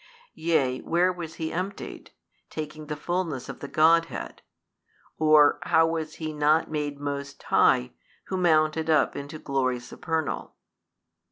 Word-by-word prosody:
yea 135 -6 +1
where 180 +2 +1
was 165 -3 -7
he 160 -1 -4
emptied, 185 +4 -5 0.4
taking 155 0 -6
the 150 - -3
fulness 165 -3 -3
of - - -8
the 140 - -6
Godhead? 165 +2 +2 0.8
or 155 -2 +5
how 160 - +4
was 160 -1 -3
he 155 -1 -5
not 150 +2 +2
made 145 -2 -3
most 140 -1 -5
high 60 - +3 0.3
who 190 - -4
mounted 160 -3 +2
up 155 -3 +3
into 140 +2 -6
glory 130 -4 -1
supernal? 160 +5 -4
155 Hz, 135 wpm, -26 LUFS, 145-165 Hz, 0.8 s, or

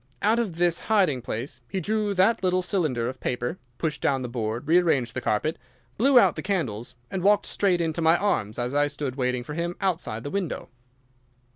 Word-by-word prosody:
Out 220 +3 +4
of 210 -8 -2
this 175 0 +2
hiding 185 - +3
place 120 +2 -5
he 195 - -2
drew 210 +2 -1
that 190 +5 +3
little 185 -1 +1
cylinder 155 - 0
of 130 0 -5
paper, 125 +7 -3 0.2
pushed 160 -2 -2
down 135 -2 +1
the - - -3
board, 115 +2 -3
rearranged 160 -8 +3
the 130 - -3
carpet, 155 +10 0 0.4
blew 265 +4 +4
out - - +6
the - - -4
candles, 130 - -2 0.2
and 190 - -2
walked 205 +2 +4
straight 190 -3 +1
into 165 0 -1
my 165 +1 +5
arms 110 - 0
as 125 +1 -2
I 145 0 +3
stood 145 -3 -4
waiting 125 -2 -1
for 150 - -7
him 170 +2 -2
outside 165 - -2
the 145 - -5
window. 195 -5 -3
160 Hz, 195 wpm, -26 LUFS, 125-190 Hz, 0.4 s, out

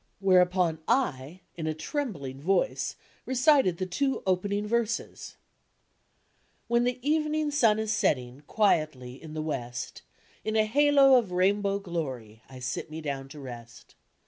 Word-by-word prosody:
" - - -44
Where 190 -2 +5
u[>on 180 -3 0
I, 180 - 0
in 160 -2 -4
a 155 - -1
trembling 155 - -4
voice, 190 - 0 0.3
recited 260 - +3
the 185 - -2
two 270 +9 -1
opening 200 +2 0
verses: 230 +1 -2 1.3
"When 235 +1 +2
the 250 0 0
evening 305 0 +1
sun 230 -7 +3
is 220 -1 -1
sening 130 - 0
Quietly 155 - 0
in 155 -1 -9
the 155 - -2
west, 125 -5 -5 0.4
In 220 0 -2
a 215 -1 +4
halo 275 +2 +5
of 215 -6 -5
rainbow 200 +2 +2
glory, 135 - -5
I 130 - -11
sit 125 +5 -4
me 155 +1 -6
down 140 -3 -5
to 150 - -10
rest. 120 -3 -11
185 Hz, 145 wpm, -28 LUFS, 145-235 Hz, 1.3 s, Where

